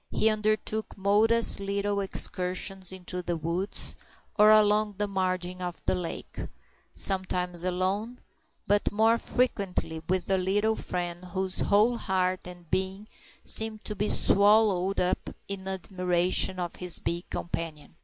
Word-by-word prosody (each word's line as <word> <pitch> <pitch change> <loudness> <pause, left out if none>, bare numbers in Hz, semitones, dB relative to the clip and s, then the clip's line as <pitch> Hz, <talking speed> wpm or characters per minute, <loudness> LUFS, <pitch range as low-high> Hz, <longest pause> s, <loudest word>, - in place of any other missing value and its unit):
He 220 - +1
undertook 215 0 -2
modest 215 +4 +5
little 200 +1 -2
excursions 185 0 +1
into 180 -1 -5
the 175 -1 -3
woods 170 +5 -2 0.4
or 210 0 +6
along 210 -1 +4
the 210 - 0
margin 185 -2 -3
of 175 -1 -5
the - - +1
lake, 180 -2 -6 0.5
sometimes 180 -2 +2
alone, 190 +6 -2 0.5
but 205 0 +1
more 225 +2 +2
frequently 195 -11 -2
with 185 -2 0
a 190 - +2
little 205 +4 0
friend 175 -2 -5
whose 185 +1 -2
whole 215 +4 +2
heart 185 -1 -1
and 175 -1 -12
being 190 +2 -2 0.4
seemed 220 -1 +3
to 210 - -2
be 210 +1 -1
swallowed 200 -2 +3
up 180 - -1 0.2
in 195 -1 -4
admiration 185 -1 0
of 175 -1 -4
his 180 -2 0
big 170 +1 -4
companion. 165 -3 -6
190 Hz, 135 wpm, -27 LUFS, 180-210 Hz, 0.5 s, or